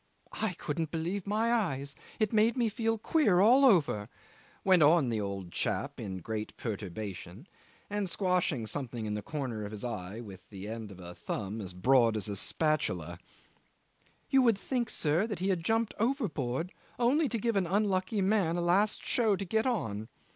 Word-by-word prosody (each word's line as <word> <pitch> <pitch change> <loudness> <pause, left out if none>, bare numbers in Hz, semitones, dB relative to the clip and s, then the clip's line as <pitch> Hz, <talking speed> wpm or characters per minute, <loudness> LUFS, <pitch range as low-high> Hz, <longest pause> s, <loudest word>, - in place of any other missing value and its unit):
I 220 -4 +1
couldn't 160 -1 -3
believe 175 +5 -3
my 220 +3 +1
eyes. 140 - -1 0.3
It 215 0 +1
made 220 +3 +3
me 235 -3 +2
feel 225 +1 0
queer 215 - +3
all 245 +8 +6
over," 155 - +4 0.5
went 185 -3 +5
on 150 -3 +5
the 110 -2 -1
old 100 -3 -5
chap, - - -2
in 95 -2 -4
great 110 +4 -5
perturbation, 100 - -6 0.4
and 205 -2 -2
squashing 180 - 0
something 120 -1 -3
in 105 - -2
the 105 - -3
corner 125 -6 -4
of 100 - -5
his 105 -1 -8
eye 105 -3 -5
with 95 -5 -11
the 100 -1 -8
end 110 -1 -6
of 95 - -12
a 90 -1 -8
thumb 100 +4 -4
as 90 -3 -6
broad 115 +2 +4
as 105 - -1
a 100 - -3
spatula. 90 - 0 1.1
"You 270 - +4
would 230 -5 +4
think, 240 +2 -2
sir, 160 +7 +1
he 190 +3 -1
had 180 -4 0
jumped 225 +3 +1
overboard 180 - -1 0.2
only 270 +5 +3
to 230 - -1
give 230 +1 0
an 190 -3 +1
unlucky 195 +1 +1
man 190 -4 +2
a - - 0
last 190 +5 +2
show 220 -4 +3
to 195 +1 -4
get 220 +6 +1
on. 110 - -2
165 Hz, 175 wpm, -31 LUFS, -, 1.1 s, all